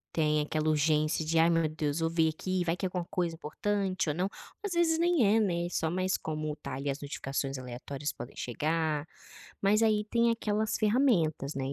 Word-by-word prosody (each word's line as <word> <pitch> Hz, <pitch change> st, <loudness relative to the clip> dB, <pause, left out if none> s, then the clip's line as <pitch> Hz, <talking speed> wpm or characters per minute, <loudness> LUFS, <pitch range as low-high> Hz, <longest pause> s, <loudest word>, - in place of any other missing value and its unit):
Tem 150 Hz, -1 st, +2 dB
aquela 155 Hz, +1 st, 0 dB
urgência 155 Hz, +1 st, +2 dB
de: 165 Hz, +1 st, +2 dB
"Ai 165 Hz, +1 st, +5 dB
meu 165 Hz, -1 st, +3 dB
Deus, 155 Hz, -1 st, -2 dB
vou 165 Hz, -, +1 dB
ver 165 Hz, -1 st, +2 dB
aqui, 185 Hz, +3 st, -2 dB
vai 170 Hz, 0 st, 0 dB
que 190 Hz, -, -2 dB
é -, -, +2 dB
alguma 180 Hz, -1 st, -3 dB
coisa 175 Hz, -2 st, -1 dB
importante 190 Hz, +3 st, -1 dB
ou 145 Hz, -, -1 dB
não", 185 Hz, +3 st, 0 dB, 0.3 s
às 410 Hz, -, -3 dB
vezes 330 Hz, -1 st, +3 dB
nem 340 Hz, -7 st, +3 dB
é, -, -, +5 dB
né, 175 Hz, -5 st, 0 dB
só 160 Hz, -1 st, 0 dB
mas 185 Hz, +2 st, 0 dB
como 155 Hz, -1 st, -3 dB
tá 140 Hz, -2 st, -6 dB
ali, 135 Hz, +2 st, -4 dB
as 135 Hz, -, -6 dB
notificações 135 Hz, -1 st, -3 dB
aleatórias 130 Hz, +3 st, -5 dB
podem 120 Hz, -, -9 dB
chegar. 155 Hz, +3 st, -1 dB, 0.5 s
Mas 210 Hz, +3 st, +4 dB
aí 215 Hz, -1 st, +3 dB
tem 235 Hz, 0 st, +3 dB
aquelas 215 Hz, -1 st, 0 dB
ferramentas, 205 Hz, -, +2 dB
né, 135 Hz, -1 st, -3 dB
e -, -, -2 dB
165 Hz, 205 wpm, -30 LUFS, 150-195 Hz, 0.5 s, Ai